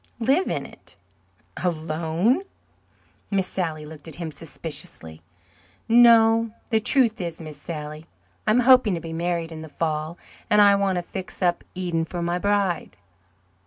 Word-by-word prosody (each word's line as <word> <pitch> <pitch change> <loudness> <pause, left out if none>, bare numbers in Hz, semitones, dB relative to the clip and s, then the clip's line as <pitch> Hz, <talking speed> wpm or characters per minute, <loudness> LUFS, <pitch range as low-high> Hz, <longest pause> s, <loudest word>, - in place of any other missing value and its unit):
"Live 270 +10 +2
in - - -2
it." - - -13 0.7
"Alone?" 165 - 0 0.9
Miss 195 -2 +1
Sally 160 -5 -3
looked 150 0 -10
at 160 - -7
him 165 -2 -5
suspiciously. 150 - -6 0.7
"No. 230 -1 +6 0.2
The 220 - +4
truth 225 -2 +3
is, 170 -2 -5
Miss 155 -3 -9
Sally, 155 0 -7 0.4
I - - +4
am 235 +4 +4
hoping 250 -6 +5
to - - -3
be 165 0 -7
married 170 0 -2
in 160 -1 -7
the 160 - -9
fall 155 +1 -3 0.3
and 210 - +4
I 205 -1 +7
want 200 -1 +1
to 175 - -2
fix 185 +1 -7
up 175 -1 +1
Eden 175 -3 -1
for 170 +1 -4
my 175 +1 -1
bride." 200 -3 0
175 Hz, 155 wpm, -24 LUFS, 160-210 Hz, 0.9 s, I